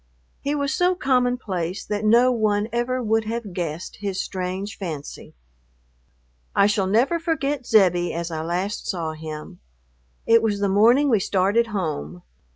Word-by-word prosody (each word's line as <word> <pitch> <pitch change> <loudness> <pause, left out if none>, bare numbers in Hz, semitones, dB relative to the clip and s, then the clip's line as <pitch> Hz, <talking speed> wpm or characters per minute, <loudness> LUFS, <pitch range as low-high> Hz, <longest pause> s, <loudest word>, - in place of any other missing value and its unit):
He 285 +1 -2
was 285 0 -1
so 360 +2 +2
common 250 -6 +1
place 185 -4 -4
that 210 0 -3
no 235 +4 +5
one 215 -3 +1
ever 245 +1 -1
would 220 0 +1
have 225 -3 -4
guessed 170 -1 -4
his 195 -2 -3
strange 190 +3 -4
fancy.... 160 -7 -7 1.2
I 200 - +5
shall 205 -2 +1
never 245 - +2
forget 295 -5 -2
Zebbie 175 -5 +3
as 170 0 -4
I 160 -1 -3
last 180 +6 -3
saw 165 -4 -2
him. 155 - -8 0.7
It 230 0 +5
was 210 -2 0
the 200 - +1
morning 235 +9 +5
we 220 - +4
started 200 +5 +1
home. 155 - -4
205 Hz, 155 wpm, -23 LUFS, 180-240 Hz, 1.2 s, no